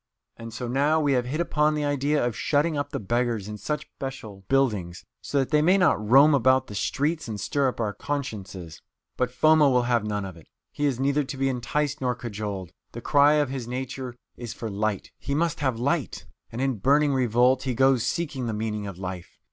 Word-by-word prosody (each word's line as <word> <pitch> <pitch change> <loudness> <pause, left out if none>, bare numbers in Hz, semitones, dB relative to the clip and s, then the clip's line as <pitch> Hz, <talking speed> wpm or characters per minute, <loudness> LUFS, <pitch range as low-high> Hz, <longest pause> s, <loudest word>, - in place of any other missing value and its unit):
And 115 0 -9
so 120 +2 -5
now 145 +6 +2
we 145 -3 +2
have 125 -2 +1
hit 150 +5 -3
upon 155 -2 +1
the 150 -1 -1
idea 145 -1 +1
of 120 -3 -2
shutting 150 +6 +1
up 145 0 -2
the - - -4
beggars 115 -1 -1
in 105 0 -7
such 150 +4 -3
special 110 -8 -7
buildings, 105 -11 0 0.2
so 145 - -3
that 135 0 0
they 150 -1 +4
may 180 +5 +4
not 180 - +3
roam 135 +8 +6
about 130 -2 +3
the 105 - -10
streets 145 - -1
and 105 -2 -5
stir 135 +7 +1
up 125 - -8
our 105 -3 -1
consciences." 100 - -5 0.3
But 125 - 0
Foma 155 +3 +4
will 125 -2 +3
have 120 -2 +1
none 105 -2 -2
of 95 -3 -9
it. 80 - -17 0.2
He 145 - -2
is 130 -3 -1
neither 140 +2 +1
to 135 +1 -6
be 135 0 +1
enticed 135 +4 -2
nor 125 -1 0
cajoled. 105 -6 -5 0.2
The 120 - -7
cry 145 +3 +4
of 150 -3 +2
his 130 -3 -5
nature 130 0 -5 0.2
is 120 -2 -6
for 115 -3 -5
light. 105 0 -2
He 140 - -3
must 165 +1 0
have 130 -5 0
light. 140 +5 -2 0.3
And 115 - -4
in 135 -5 0
burning 145 +6 +3
revolt 125 0 +3
he 130 -3 -2
goes 135 -1 +4
seeking 135 -2 -2
the 110 - -2
meaning 105 -1 -3
of 95 -3 -7
life. 90 -2 -7
130 Hz, 215 wpm, -25 LUFS, 110-145 Hz, 0.3 s, roam